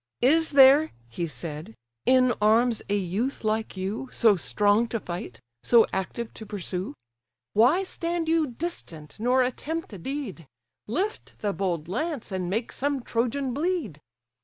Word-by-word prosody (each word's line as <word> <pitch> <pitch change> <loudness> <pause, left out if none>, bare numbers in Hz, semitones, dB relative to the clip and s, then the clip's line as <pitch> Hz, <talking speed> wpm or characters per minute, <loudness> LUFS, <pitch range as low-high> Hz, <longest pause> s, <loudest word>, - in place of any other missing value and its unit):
"Is 315 +4 +4
there 280 +3 +7 0.2
(he 170 +9 -3
said) 155 - -6 0.3
in 255 -1 +5
arms 225 +2 +4
a 205 - +2
youth 205 +9 -2
like 215 -1 -1
you, 205 +8 -3
So 220 -4 +4
strong 205 - +2
to 230 0 -3
fight, 175 - -7 0.2
so 235 -2 +5
active 190 +5 -3
to 220 - -9
pursue? 185 -4 -4 0.6
Why 255 - +4
stand 340 -2 -3
you 325 -1 +2
distant, 230 - -7
nor 250 +3 +3
attempt 305 +3 -4
a 195 - -8
deed? 215 - -5 0.4
Lift 375 - -3
the 205 -2 0
bold 175 -6 -2
lance, 260 - -3
and 185 -2 -2
make 225 +5 -2
some 280 -2 -2
Trojan 250 +3 -1
bleed." 290 - -2
230 Hz, 145 wpm, -26 LUFS, 190-275 Hz, 0.6 s, there